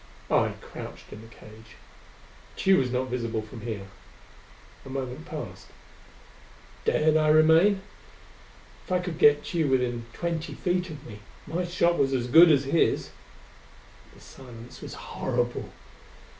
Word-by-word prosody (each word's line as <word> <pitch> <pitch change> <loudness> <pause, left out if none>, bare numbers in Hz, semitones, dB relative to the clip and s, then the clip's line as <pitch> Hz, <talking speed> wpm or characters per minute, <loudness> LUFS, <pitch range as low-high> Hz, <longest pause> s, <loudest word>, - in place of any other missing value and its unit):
I - - +3
crouched - - -10
in 105 - -10
the 115 - -13
cage. 110 -1 -15 0.8
Tugh 190 0 +4
was 125 -2 -1
not 130 +1 -1
visible 115 -3 -2
from 110 +1 -11
here. 105 -3 -5 1.0
A - - -11
moment 135 +4 -5
passed. 115 - -7 1.2
Dared 155 +1 +3
I 155 -1 +2
remain? 160 +6 +5 1.0
If - - -11
I 180 - +3
could 180 -3 -5
get 145 0 +5
Tugh 160 -5 0
within 120 -3 0
twenty 170 +2 -4
feet 180 0 -1
of 150 -2 -9
me, 105 -3 -10 0.3
my 170 +4 -2
shot 175 0 +1
was 135 -1 +2
as 125 -2 0
good 160 +6 +8
as 140 -2 +4
his.... 140 +5 +1 1.0
The - - -16
silence 120 -2 -12
was - - -8
horrible. 120 -1 -3
135 Hz, 140 wpm, -27 LUFS, 120-165 Hz, 1.2 s, good